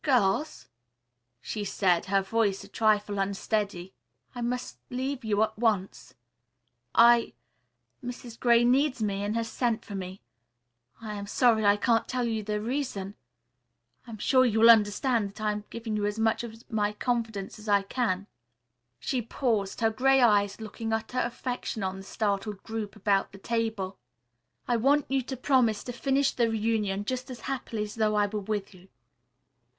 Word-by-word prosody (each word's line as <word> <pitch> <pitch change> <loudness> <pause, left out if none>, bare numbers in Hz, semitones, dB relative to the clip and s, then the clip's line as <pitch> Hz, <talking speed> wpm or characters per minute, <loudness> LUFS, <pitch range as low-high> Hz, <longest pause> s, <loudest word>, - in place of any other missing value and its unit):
"Girls," 255 +2 +1 0.7
she 210 - -4
said, 185 -3 +1
her 195 0 +2
voice 200 -1 0
a - - -12
trifle 205 -1 +1
unsteady, 195 -1 -2 0.4
"I 245 - -6
must 240 - -3
leave 260 +1 -3
you 215 -1 +2
at 220 0 -2
once. 190 - -1 0.8
I 235 0 +6 0.7
Mrs. 240 -1 -8
Gray 235 -1 +5
needs 260 -1 +2
me 200 -1 -1
and 205 +2 -2
has 230 0 -1
sent 230 -1 -1
for 205 - -8
me. 190 0 -6 0.8
I 215 -2 -5
am 200 -1 -6
sorry 225 0 +3
I 205 0 +5
can't 230 +1 +2
tell 255 -1 -1
you 225 -2 -1
the 210 0 -2
reason. 225 -5 -3 0.9
I - - -11
am 220 - -7
sure 255 +5 +4
you 220 -3 +2
will 230 +1 +10
understand 220 +1 +2
that 210 +3 -12
I 215 -1 +1
am 210 0 -5
giving 225 -2 -4
you 205 -1 0
as 205 +1 -3
much 225 +1 +1
of 225 0 -9
my 210 -1 0
confidence 220 -3 -2
as 215 0 -8
I 200 -1 +4
can." 200 -3 -1 0.7
She 255 -3 -1
paused, 225 -4 -1
her 225 -1 +3
gray 270 +4 +3
eyes 205 -4 +3
looking 225 +1 -5
utter 225 +3 -2
affection 240 -3 -3
on 190 0 -2
the 195 - -9
startled 200 0 -2
group 220 -2 -5
about 200 -2 +1
the - - -10
table. 220 -3 -2 0.7
"I 240 - +2
want 280 +5 +3
you 270 0 +1
to 260 +1 -6
promise 245 -5 +2
to 245 - -5
finish 270 +2 +1
the 235 -2 +1
reunion 215 -3 0
just 255 +2 -3
as 250 -2 -8
happily 250 -5 -3
as 210 0 -6
though 215 -1 +1
I 205 0 +3
were 210 +1 -3
with 205 0 -3
you. 185 0 -17
220 Hz, 170 wpm, -28 LUFS, 205-240 Hz, 0.9 s, will